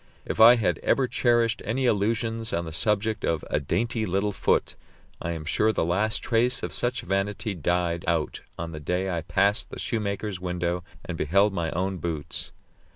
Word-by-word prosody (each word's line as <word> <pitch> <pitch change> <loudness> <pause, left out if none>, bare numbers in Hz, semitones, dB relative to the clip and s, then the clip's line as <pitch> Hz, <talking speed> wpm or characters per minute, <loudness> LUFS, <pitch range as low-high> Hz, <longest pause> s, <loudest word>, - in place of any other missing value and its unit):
If - - -4
I 115 +2 +10
had 115 -4 0
ever 135 -2 +2
cherished 120 -2 +2
any 130 +4 -1
illusions 115 +1 0
on 85 0 -1
the 80 - -6
subject 105 +3 0
of 80 -2 0
"a - - +2
dainty 115 - -1
little 100 +3 0
foot," 95 - +1 0.5
I 85 - -2
am 80 -2 -6
sure 110 +7 +2
the 95 - 0
last 105 +6 0
trace 120 +1 +1
of - - -3
such 125 +1 0
vanity 100 +2 -1
died 85 0 0
out 80 -2 0 0.2
on 85 0 -4
the 80 - -6
day 90 +5 -1
I 85 - -1
passed 100 +6 +1
the - - -8
shoemaker's 100 -3 -2
window 90 -1 -2 0.2
and 85 -2 -5
beheld 100 +6 +3
my 85 -3 -1
own 95 +2 -1
boots. 80 -3 -3
100 Hz, 180 wpm, -26 LUFS, 85-110 Hz, 0.5 s, I